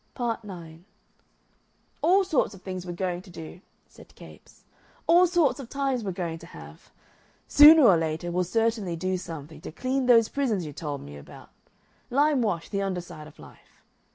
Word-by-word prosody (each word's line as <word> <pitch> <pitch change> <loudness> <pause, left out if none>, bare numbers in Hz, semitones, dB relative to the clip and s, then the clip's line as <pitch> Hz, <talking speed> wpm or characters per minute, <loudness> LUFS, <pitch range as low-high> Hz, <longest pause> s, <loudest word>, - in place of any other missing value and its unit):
Part 230 -2 -3
9 170 -5 -11 1.2
"All 380 +4 +4
sorts 315 - 0
of 190 - -17
things 185 -1 -6
we're - - -4
going 180 0 -3
to 185 - -17
do," 170 +1 -10 0.3
said - - -18
Capes; - - -16 0.4
"all 355 +2 +5
sorts 335 -5 +1
of 255 -4 -9
times 270 -4 -2
we're 195 - -3
going 170 -2 -5
to 170 - -13
have. - - -13 0.6
Sooner 305 +1 +8
or 195 -8 +6
later 160 +1 -3
we'll 180 +1 0
certainly 220 -2 -1
do 185 +3 -2
something 160 -3 -8
to - - -8
clean 255 +8 -2
those 230 -3 +6
prisons 230 - -1
you 150 - -8
told 145 -1 -5
me 70 0 -10
about 70 - -14 0.6
limewash 250 - +1
the 200 -1 -1
underside 180 -5 -5
of 155 - -17
life. - - -18
190 Hz, 170 wpm, -26 LUFS, 170-255 Hz, 1.2 s, Sooner